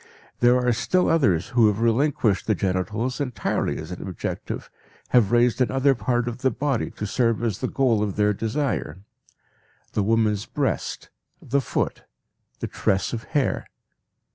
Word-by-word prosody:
There 120 +1 +5
are 125 -1 +2
still 150 +11 +1
others 115 - +2
who 120 -3 +4
have 105 0 +1
relinquished 115 -3 +1
the 110 - +3
genitals 105 +8 -1
entirely 125 -4 -1
as 80 +3 -7
an 90 - -6
objective, 90 - -5 0.4
have 120 -6 +4
raised 120 +1 +3
another 135 +2 +3
part 120 -1 -1
of 120 +1 -4
the 130 - +2
body 135 0 -1
to 105 - -6
serve 115 +2 +1
as 110 -5 -1
the - - -1
goal 125 -6 +2
of 105 -3 -1
their 105 0 +2
desire; 120 +2 -2 1.0
the - - +1
woman's 105 -1 +1
breast, - - -2 0.3
the 140 +3 0
foot, - - -2 0.6
the - - -2
tress 95 +4 0
of 115 -1 -4
hair. 140 -3 +1
115 Hz, 155 wpm, -24 LUFS, 105-130 Hz, 1.0 s, There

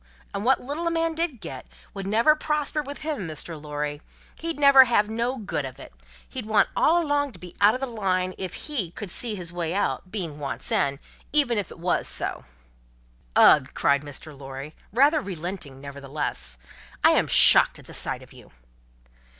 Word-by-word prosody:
And 200 - -3
wot 260 +3 +4
little 295 +6 -3
a - - +3
man 330 0 0
did 320 -8 -3
get, 130 -7 -8 0.3
would 195 -1 -5
never 230 +9 +4
prosper 300 0 -1
with 285 +1 -8
him, 295 - -3
Mr. 160 0 -5
Lorry. 150 0 -4 0.3
He'd 330 -2 -5
never 280 -2 +8
have 215 -3 +2
no 235 +4 -1
good 195 - -3
of 130 -1 -8
it; - - -12 0.3
he'd 245 -5 -7
want 215 -1 +3
all 340 +2 +3
along 285 -2 0
to 180 - -12
be 180 0 -11
out 205 +3 +6
of 255 - -5
the - - 0
line, 185 -6 -1
if 185 -2 -6
he, 250 - -2
could 185 +2 -7
see 225 +1 0
his 175 -3 -6
way 170 0 -2
out, 195 -2 -1
being 170 -8 -4
once 140 -2 -5
in 140 -1 +1 0.3
even 275 -7 +2
if 200 - -4
it - - -12
wos 175 +1 0
so." - - -3 0.9
"Ugh!" - - +6
cried 140 0 +2
Mr. 145 +1 -7
Lorry, 135 +2 -8 0.2
rather 285 +7 +4
relenting, 175 - -6
nevertheless, 140 - -4 0.5
"I - - +7
am - - +3
shocked - - +6
at - - -15
the - - -12
sight - - -1
of - - -17
you." - - -15
200 Hz, 190 wpm, -25 LUFS, -, 0.9 s, never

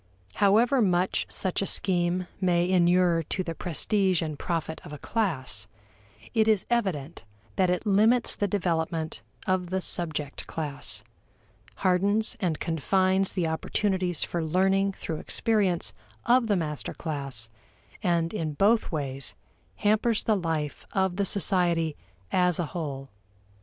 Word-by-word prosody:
However 230 +6 +4
much 185 -2 +1
such 185 0 -1
a 195 - -1
scheme 180 -1 0
may 175 -2 +2
inure 175 -1 +3
to 185 - -1
the 165 - -4
prestige 185 +2 0
and 155 -3 -5
profit 165 -2 -3
of - - -10
a 150 - -6
class, 130 - -1 0.7
it 220 -2 +3
is 215 -3 +3
evident 170 - -1 0.3
that 185 -2 +2
it 180 +4 0
limits 220 +4 +3
the 205 - 0
development 165 -4 -1 0.2
of 185 -2 0
the 190 +1 0
subject 155 -6 -2
class; 145 -3 -4 0.8
hardens 200 +6 +2
and 175 -6 -1
confines 185 +4 +1
the 175 -3 0
opportunities 180 +1 0
for 170 -2 -2
learning 190 +4 +2
through 160 -4 -5
experience 205 -7 +1 0.3
of 245 -1 +4
the 205 - +2
master 150 -4 -3
class, 135 -7 -4 0.5
and 170 -3 +1
in 160 -7 -2
both 215 +8 +3
ways 140 -5 -2 0.4
hampers 215 +2 +2
the 220 - +2
life 160 -5 -2
of 190 -2 +1
the 200 - +1
society 175 -5 +2 0.4
as 180 -2 +3
a 175 - -1
whole. 140 -5 -4
180 Hz, 135 wpm, -27 LUFS, 160-195 Hz, 0.8 s, However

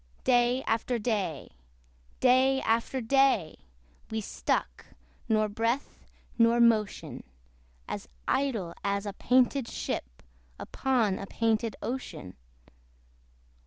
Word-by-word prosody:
Day 245 +1 +3
after 230 +2 0
day, 205 - -2 0.7
day 260 +1 +4
after 230 +3 0
day, 260 - +2 0.5
We 220 - -2
stuck, 210 - -2 0.4
nor 215 -1 +3
breath 230 +6 -2 0.3
nor 230 +1 +5
motion; 220 -4 +1 0.6
As - - -5 0.2
idle 225 -11 0
as 200 0 -1
a 205 - -4
painted 255 +3 +2
ship - - -5 0.3
Upon 235 -8 0
a 195 - -6
painted 225 -1 0
ocean. 225 - -5
230 Hz, 95 wpm, -29 LUFS, 210-255 Hz, 0.7 s, nor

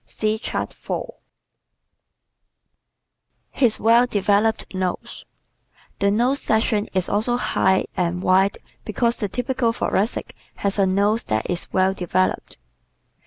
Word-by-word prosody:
(See 215 0 -1
Chart - - -4
4) - - -5 2.4
His 240 -5 +1
Well 235 +2 +4
Developed 205 0 +1
Nose 185 -1 -4 0.7
¶ - - -45
The 200 - +3
nose 245 +7 +2
section 220 -1 +1
is 185 -2 +1
also 225 +4 +1
high 190 -5 +1
and 180 0 -1
wide 190 +2 +3 0.3
because 235 +2 0
the 205 - -2
typical 245 +1 0
Thoracic 215 0 -2 0.2
has 200 0 -2
a 195 - +4
nose 205 +4 +1
that 110 0 -1
is 175 -1 -3
well 190 0 +2
developed. 185 0 -1
205 Hz, 120 wpm, -22 LUFS, 190-230 Hz, 2.4 s, Well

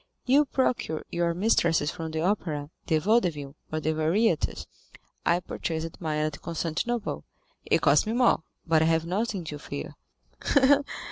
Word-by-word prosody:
You 280 +4 +5
procure 255 - -1
your 170 -1 0
mistresses 170 -5 +2
from 160 -1 -5
the 160 0 -3
opera, 160 -6 -1 0.2
the 160 - +3
Vaudeville, 155 -7 +1 0.2
or 155 - -1
the 155 0 0
Variétés; 165 +3 +1 0.6
I 170 +1 +4
purchased 165 -2 -4
mine 155 -2 -1
at 155 -1 -4
Constantinople; 170 +8 -2 0.4
it - - +2
cost - - +4
me 220 - 0
more, 245 -7 +3 0.2
but 160 -1 +3
I - - +4
have 160 0 +2
nothing 195 +1 -2
to 150 -2 -6
fear." - - -6
165 Hz, 145 wpm, -27 LUFS, 155-205 Hz, 0.6 s, You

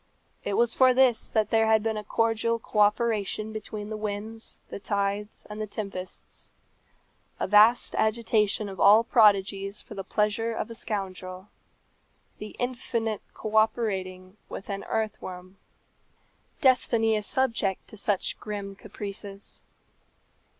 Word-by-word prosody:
It 200 - -1
was 235 -1 +3
for 255 -1 +5
this 255 -3 +4
that 215 -2 +1
there 225 -1 +4
had 220 -1 +4
been 225 -1 0
a 210 - -4
cordial 225 +2 +1
co 220 -1 -4
operation 215 0 +1
between 210 -1 -6
the - - -2
winds, 215 +2 -5
the - - -5
tides, 200 +1 -2
and 210 0 -6
the 215 - -3
tempests 195 -3 -7 0.9
a - - 0
vast 215 +4 +5
agitation 220 -1 +1
of 195 -1 -8
all 210 +3 +7
prodigies 200 -3 +3
for - - -11
the 195 -1 -5
pleasure 210 +3 0
of 225 - -4
a - - -5
scoundrel; 190 -3 -5 0.9
the 210 0 -8
infinite 240 -3 -2
co 215 0 -5
operating 195 -4 0
with 195 - -7
an 200 0 -4
earthworm! 185 -4 -4 1.0
Destiny 230 -5 +3
is 210 -1 -1
subject 225 -7 0
to - - -11
such 200 -1 0
grim 200 -2 -5
caprices. 200 -1 -7
210 Hz, 135 wpm, -27 LUFS, 200-225 Hz, 1.0 s, all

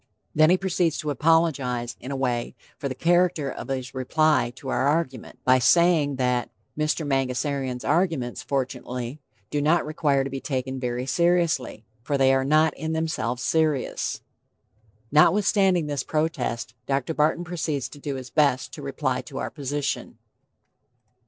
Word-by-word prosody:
Then 155 +1 +5
he 180 - +5
proceeds 180 -4 0
to 150 - -2
apologize, 140 -7 +1
in 130 - -8
a 140 - -3
way, 125 -3 -1 0.2
for 140 - -3
the 130 - -4
character 170 -3 +2
of - - -7
his 130 -2 -4
reply 130 -1 +2
to 135 - -8
our 130 - +1
argument, 145 -5 -1
by 130 0 +5
saying 160 0 +4
that 125 -1 0 0.3
"Mr. 155 +1 0
Mangasarian's 135 -1 -1
arguments, 160 -9 0
fortunately, 125 0 -3 0.3
do 145 - 0
not 155 +3 +3
require 145 -3 +1
to 135 - -4
be 135 - -3
taken 130 -1 -3
very 125 0 -2
seriously, 170 -7 +1 0.2
for 140 +4 -1
they 135 0 +4
are 135 0 +2
not 155 +3 +3
in 160 0 -3
themselves 160 -6 -2
serious." 155 -4 0 0.9
Notwithstanding 185 +2 +4
this 145 -2 -2
protest, 130 -8 -2
Dr. 140 +3 0
Barton 155 +3 +1
proceeds 160 -6 -2
to 145 - -12
do 140 -1 -4
his 130 -1 -8
best 140 -4 +2
to 150 - -8
reply 135 -2 -2
to 135 +1 -10
our - - -3
position. 145 -1 -3
140 Hz, 150 wpm, -25 LUFS, 130-160 Hz, 0.9 s, Then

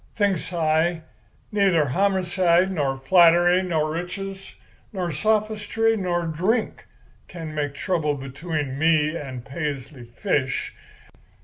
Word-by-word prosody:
Thinks 200 -6 0
I, 160 0 +1 0.5
neither 195 -7 +3
homocide 185 +2 +2
nor 140 -6 -1
flattery 175 +4 +5
nor 160 -4 -1
riches 195 +4 -6 0.4
nor 180 -4 -3
sophistry 215 +5 +1
nor 175 -4 -1
drink 185 +9 -1 0.4
can 165 -3 -7
make 145 -2 -3
trouble 150 -3 -1
between 140 0 -4
me 155 0 +3
and 130 -6 -6
Paisley 140 -3 -5
Fish. 130 - -2
170 Hz, 105 wpm, -23 LUFS, 150-190 Hz, 0.5 s, flattery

